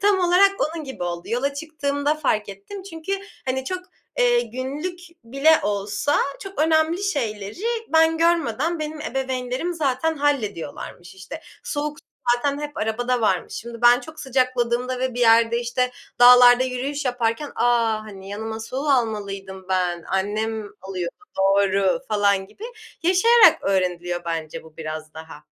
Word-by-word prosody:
Tam 405 -1 +3
olarak 360 +3 +5
onun 315 0 -2
gibi 265 -8 -7
oldu. 175 -1 -4
Yola 275 +4 -1
çıktığımda 285 -1 -1
fark 220 -9 -1
ettim 200 - -9
çünkü, 370 0 -6 0.3
hani, 260 0 -1
çok, 370 +6 -3 0.4
eee, 485 -1 +4
günlük 295 - -5 0.3
bile 275 +6 +3
olsa 205 +6 0 0.3
çok 390 0 -9
önemli 320 +3 +2
şeyleri 230 - -3 0.3
ben 320 0 +4
görmeden, 330 -1 +1
benim 305 0 -5
ebeveynlerim 265 +3 -3
zaten 315 +1 0
hallediyorlarmış. 210 - -3
İşte, 190 +12 -9 0.2
soğuk 295 -9 -3
su - - -19 0.3
zaten 280 +3 -2
hep 295 0 -6
arabada 240 +3 -1
varmış. 190 -5 0
Şimdi 235 +1 -8
ben 240 0 +6
çok 315 -1 -11
sıcakladığımda 255 -1 0
ve 255 -1 -2
bir 245 - -3
yerde, 230 0 +4
işte, 250 +1 -1 0.3
dağlarda 245 0 +8
yürüyüş 265 +3 -3
yaparken, 245 +3 -1
"A, 240 -1 +2 0.2
hani, 195 -2 -11
yanıma 220 +2 -5
su 225 +3 -7
almalıydım 205 -9 -1
ben, 180 -2 0
annem 210 +2 -2
alıyordu, 185 -2 -5 0.2
doğru." 195 0 +2
falan 200 -2 +2
gibi 410 - -12 0.4
yaşayarak 410 +7 +6
öğreniliyor 175 -2 -1
bence 165 -2 -4
bu 160 -1 -17
biraz 155 -1 -6
daha. 160 -1 -11
245 Hz, 140 wpm, -23 LUFS, 200-300 Hz, 0.4 s, dağlarda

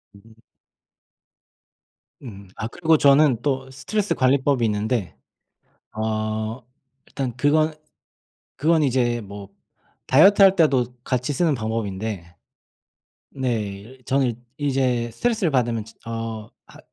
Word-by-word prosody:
음. 110 +2 -18 1.9
음. 100 -5 -10
아 110 - -4
그리고 160 +4 +2
저는 140 -4 +4
또 135 -2 -2
스트레스 205 +10 -2
관리법이 135 -1 +2
있는데 105 -3 -1 0.8
어 110 +2 -2 0.5
일단 130 -4 -4
그건 155 +3 +2 0.8
그건 160 +3 +2
이제 120 -3 +1
뭐 100 -1 -10 0.6
다이어트할 195 +7 +6
때도 130 -7 +2
같이 125 +3 -1
쓰는 165 0 +1
방법인데 105 -6 -4 1.0
네. 125 -5 -1
일 105 +6 -10
저는 135 -1 +1
일 115 - -6 0.3
이제 125 -3 0
스트레스를 220 - 0
받으면 120 -4 0
진 110 - -17
어 115 -2 -5 0.2
하 - - -16
125 Hz, 225 characters per minute, -23 LUFS, 110-140 Hz, 1.9 s, 다이어트할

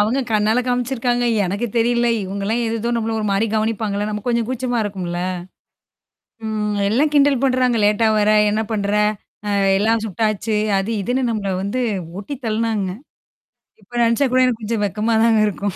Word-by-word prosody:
அவுங்க 225 +6 +2
கண்ணால 215 +3 +2
காமிச்சிருக்காங்க. 245 -1 0 0.2
எனக்கு 200 +6 -2
தெரியல. 240 +1 +2 0.2
இவுங்கலாம் 200 +5 -2
ஏதோதோ 230 +1 -2
நம்மள 225 0 -1
ஒருமாரி 205 +1 +1
கவனிப்பாங்கள்ல. 215 -1 -1
நம்ம 210 -1 -4
கொஞ்சம் 235 -2 +1
கூச்சமா 250 -1 -2
இருக்கும்ல. 180 -4 -4 1.3
ம். 210 -1 -2
எல்லாம் 290 +7 +2
கிண்டல் 280 -3 +4
பண்றாங்க, 255 -2 +2
லேட்டா 210 +2 +3
வர 210 0 +2 0.2
என்ன 215 +1 0
பண்ற? 200 -2 -1 0.6
அ - - 0 0.2
எல்லாம் 220 +2 +1
சுட்டாச்சு, 215 +1 -1 0.2
அது 195 +4 -3
இதுன்னு 255 +4 0
நம்மள 205 -3 -2
வந்து 205 +6 -2 0.4
ஓட்டி 255 +7 -6
தள்னாங்க. 220 -3 -1 0.9
இப்ப 210 +5 -23
நெனச்சா 230 +4 +2
கூட 255 - +4
எனக்கு 235 -3 -1
கொஞ்சம் 215 -1 -1
வெக்கமா 215 +4 -1
தாங்க 225 -2 +4
இருக்கும். 200 -1 -3
220 Hz, 150 wpm, -20 LUFS, 205-240 Hz, 1.3 s, கிண்டல்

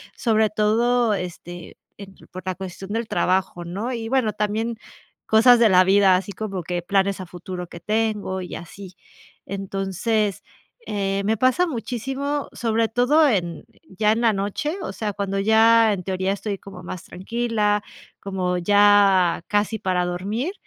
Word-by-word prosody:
sobre 220 -2 +2
todo, 225 +2 +2
este, 175 -2 -7 0.2
entre 195 -1 -13
por 185 -1 -9
la 185 -1 -2
cuestión 190 +1 -8
del 230 0 -2
trabajo, 185 -1 0
¿no? 200 +8 -4
Y 230 -2 -4
bueno, 255 -4 +1
también 220 +2 -2 0.5
cosas 235 +2 +6
de 235 - +6
la 185 0 +6
vida, 195 0 +5
así 190 +2 -2
como 195 -2 -5
que 175 +1 -3
planes 195 +2 0
a 185 - -6
futuro 180 +1 -7
que 170 - -11
tengo 210 -1 -1
y 180 - -7
así. 185 +2 -10 0.5
Entonces, 195 +2 -2 0.4
eh, 195 -1 -1
me 220 +2 +1
pasa 255 - +2
muchísimo, 270 +2 -3
sobre 230 -1 0
todo 275 +7 +3
en 175 - -2 0.2
ya 210 +3 +1
en 225 +2 0
la 230 -2 +3
noche. 205 - -2
O - - -4
sea, 210 -2 -4
cuando 195 0 -3
ya, 220 +1 +5
en 185 -2 -5
teoría, 190 +1 -1
estoy 200 +1 -3
como 190 -2 -12
más 175 0 -7
tranquila, 210 0 -1 0.4
como 185 -2 -2
ya 200 -2 +4
casi 210 +1 0
para 180 -2 0
dormir, 205 - -3
205 Hz, 155 wpm, -22 LUFS, 185-225 Hz, 0.5 s, cosas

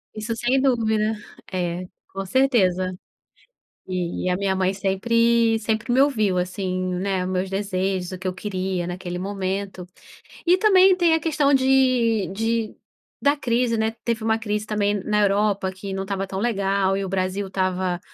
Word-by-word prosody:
Isso, 215 +1 -3
sem 245 +3 +1
dúvida. 220 -4 +1 0.4
É, 180 -1 -2 0.3
com 195 0 -5
certeza, 185 -6 +2 0.9
e 180 -2 -3
e - - 0
a 180 - +1
minha 190 0 0
mãe 190 0 +1
sempre 230 +4 +2
sempre 220 +2 -1
me 260 - +4
ouviu 215 -10 +2
assim, 185 0 -2
né, 185 0 -1
meus 185 0 -2
desejos, 190 -2 -2
o 185 - -5
que 190 - -7
eu 185 - 0
queria, 185 -2 -3
naquele 180 0 -5
momento. 195 -1 -4 0.6
E 355 +2 +5
também 380 -2 +6
tem 345 -3 +3
a 320 - +3
questão 295 -3 +1
de 255 -5 +3
de 225 +1 -1 0.5
da 285 +1 +3
crise 240 -2 0
né, 220 0 +1
teve 230 -2 -1
uma 220 0 +1
crise 210 -1 -2
também 205 -1 0
na 210 0 +1
Europa, 200 -1 +1
que 190 +1 -7
não 190 - -3
estava 195 0 -3
tão 190 0 -5
legal 195 -3 +1
e 195 - -2
o 190 - -5
Brasil 190 +1 -1
estava 185 -2 -1
200 Hz, 165 wpm, -23 LUFS, 185-230 Hz, 0.9 s, também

